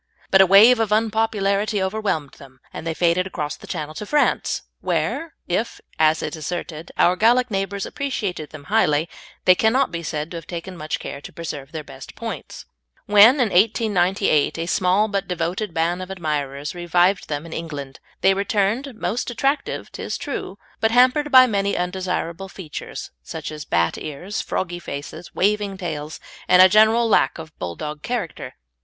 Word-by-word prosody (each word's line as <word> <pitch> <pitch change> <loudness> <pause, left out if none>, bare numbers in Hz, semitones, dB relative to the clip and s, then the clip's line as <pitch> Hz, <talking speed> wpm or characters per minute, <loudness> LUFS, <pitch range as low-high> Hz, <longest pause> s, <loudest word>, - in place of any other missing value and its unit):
But 190 - +7
a 190 - +6
wave 220 +6 +7
of 220 -2 0
unpopularity 215 -1 +1
overwhelmed 190 -7 -1
them, 130 -1 -15
and 165 - -6
they 165 - -2
faded 175 +2 +2
across 150 -5 -4
the - - -14
Channel 155 0 -4
to 210 - -6
France, 295 +3 +1 0.2
where, 330 0 -2
if, 210 +6 -2 0.2
as 155 0 +3
is 150 - -3
asserted, 160 0 -5
our 180 - +4
Gallic 240 +4 +3
neighbours 195 0 -2
appreciated 205 - -3
them 155 -2 -11
highly, 160 -5 +2 0.4
they 185 - +8
cannot 230 +6 +2
be 170 0 -4
said 155 0 -4
to 170 - -5
have 165 - -10
taken 175 +2 -6
much 155 -2 -3
care 140 - -7
to - - -10
preserve 150 -4 -7
their 160 -2 -5
best 135 -2 -11
points. - - -7 0.4
When, 210 +5 +7
in 250 -6 +1
1898, 195 -6 +2
a 165 - -2
small 185 +4 +2
but 200 -2 -2
devoted 180 +3 -2
band 170 +2 0
of 185 - -7
admirers 150 -6 -3
revived 175 +2 +1
them 145 +1 -3
in 165 - -8
England, 145 -5 -6 0.2
they 195 - +5
returned 210 +6 0
most 215 +5 -2
attractive, 270 +5 -1
'tis - - -4
true, - - -5 0.2
but 220 - +3
hampered 255 +5 +4
by 255 -1 +9
many 200 -4 0
undesirable 180 0 -3
features, 175 -6 -7
such 65 - -6
as 150 -1 -7
bat 85 0 +1
ears, 165 +8 -5
froggy 175 -1 -3
faces, 155 +2 -8
waving 205 0 +1
tails, 155 -4 -5 0.3
and 180 - +6
a - - +9
general 220 +3 +5
lack 170 -10 +3
of 160 -1 -10
Bulldog 150 - -5
character. 230 -7 -4
185 Hz, 170 wpm, -22 LUFS, 155-215 Hz, 0.4 s, by